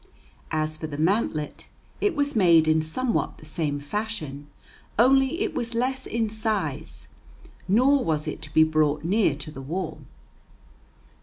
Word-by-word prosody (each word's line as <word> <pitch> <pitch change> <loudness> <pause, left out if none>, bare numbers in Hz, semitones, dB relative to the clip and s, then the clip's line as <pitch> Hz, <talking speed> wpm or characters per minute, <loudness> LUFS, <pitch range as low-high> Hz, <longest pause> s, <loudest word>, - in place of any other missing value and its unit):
As 155 0 -1
for 155 - -5
the 145 -2 -6
mantlet, 160 -3 0 0.3
it 410 -5 +1
was 285 -2 0
made 170 -6 +5
in 155 0 +4
somewhat 230 +10 -1
the 155 - -14
same 150 -2 -2
fashion, 150 -4 -4 0.5
only 270 - +4
it 425 -3 -1
was 235 0 -3
less 260 +2 -1
in 225 0 0
size, 210 -9 -3 0.6
nor 255 +8 +4
was 155 -2 -1
it - - -4
to 145 - -9
be 160 - +6
brought 155 -1 +1
near 185 -3 +2
to 150 +1 -4
the 135 - -8
wall. 170 +8 -4
170 Hz, 150 wpm, -25 LUFS, 155-230 Hz, 0.6 s, be